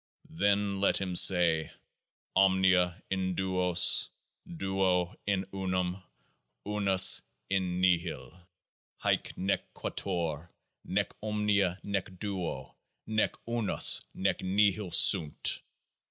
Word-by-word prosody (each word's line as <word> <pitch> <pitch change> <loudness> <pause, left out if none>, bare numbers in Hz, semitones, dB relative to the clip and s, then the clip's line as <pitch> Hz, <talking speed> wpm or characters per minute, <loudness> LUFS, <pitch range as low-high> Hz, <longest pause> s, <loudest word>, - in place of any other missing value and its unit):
] 160 - -27
Then 100 -1 +1
let 100 - +2
him 95 -2 -4
say: 85 -3 +4 0.7
OMNIA 95 -1 +2
IN 95 -1 -2
DUOS: 90 -1 +2 0.4
DUO 90 0 -1
IN 100 -1 -1
UNUM: 95 -1 -3 0.6
UNUS 100 -2 +4 0.3
IN 90 -2 -1
NIHIL: 90 -1 -2 0.6
HAEC - - -1
NEC 95 +1 -3
QUATUOR 85 -4 -5 0.4
NEC 100 +2 -2
OMNIA 105 -4 -1
NEC 95 -2 -5
DUO 95 -5 -6 0.3
NEC 110 0 -1
UNUS 115 -3 +4
NEC 95 0 -1
NIHIL 100 +1 0
SUNT. 80 -6 +4
95 Hz, 95 wpm, -29 LUFS, 90-100 Hz, 0.7 s, say